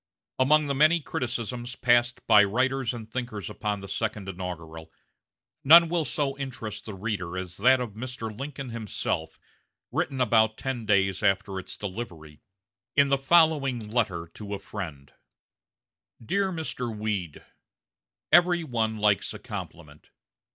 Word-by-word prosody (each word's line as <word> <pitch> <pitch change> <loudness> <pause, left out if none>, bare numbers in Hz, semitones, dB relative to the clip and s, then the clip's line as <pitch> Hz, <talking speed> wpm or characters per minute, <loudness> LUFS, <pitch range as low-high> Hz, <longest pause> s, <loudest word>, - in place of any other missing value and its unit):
Among 150 +4 +4
the 140 - -1
many 155 +5 +4
criticisms 120 -2 -4
passed 120 -1 +2
by 105 -1 +7
writers 130 +4 0
and 115 -3 -7
thinkers 120 -6 -4
upon 105 -2 -3
the 100 - -8
second 105 -2 -3
inaugural, 80 -4 -7 0.7
none 165 +4 +8
will 170 -2 0
so 140 0 -1
interest 130 -6 -6
the 105 - -7
reader 95 -3 -3
as 90 -1 -6
that 130 +5 +5
of 125 -3 -3
Mr. 115 -1 -6
Lincoln 135 +1 -6
himself, 100 -7 -3 0.5
written 135 - -1
about 110 -2 +3
ten 125 -5 -4
days 95 -2 +2
after 95 -1 +1
its 95 - -7
delivery, 90 -8 -7 0.5
in 140 -1 +5
the 140 - +3
following 135 -7 +3
letter 95 -8 0
to 105 -1 -6
a - - -4
friend: 80 -10 -8 1.1
"DEAR 195 - +1
MR. 125 -9 -4
WEED: 100 -7 -3 0.9
Every 175 -1 +5
one 115 -6 -1
likes 105 0 +1
a - - -5
compliment. 85 -9 -9
110 Hz, 135 wpm, -27 LUFS, 100-130 Hz, 1.1 s, none